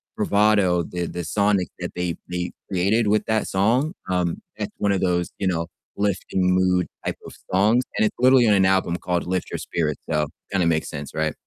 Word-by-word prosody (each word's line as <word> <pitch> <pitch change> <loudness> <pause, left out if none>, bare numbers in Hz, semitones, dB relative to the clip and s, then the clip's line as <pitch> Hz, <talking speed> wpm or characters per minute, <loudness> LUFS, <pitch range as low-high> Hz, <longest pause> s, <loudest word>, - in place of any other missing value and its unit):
bravado, 100 -4 +3
the 90 +1 -4
the 90 +1 -5
sonic 100 +2 +1
that - - -4
they 90 -1 -2
they 90 0 -3 0.2
created 100 +5 +2
with 105 0 +2
that 110 0 0
song, 120 - +1 0.2
um, 90 -2 0 0.2
that's - - -4
one 100 - +1
of 95 - 0
those, 90 -1 0
you 95 - 0
know, 85 -2 0 0.3
lifting 100 -2 -1
mood 90 -1 +2 0.2
type - - -2
of - - -9 0.2
songs, 105 +7 +3
and 220 - +3
it's 210 - -1
literally 130 -1 +6
on 105 - +5
an 95 -1 +4
album 95 -2 +2
called 90 -1 -2
Lift 90 0 -2
Your - - -2
Spirit, 75 -3 -2
so 75 -2 +1 0.2
kinda 90 -4 +2
makes 80 -1 0
sense, 75 -1 -6
right? 80 -1 0
95 Hz, 200 wpm, -23 LUFS, 90-105 Hz, 0.3 s, literally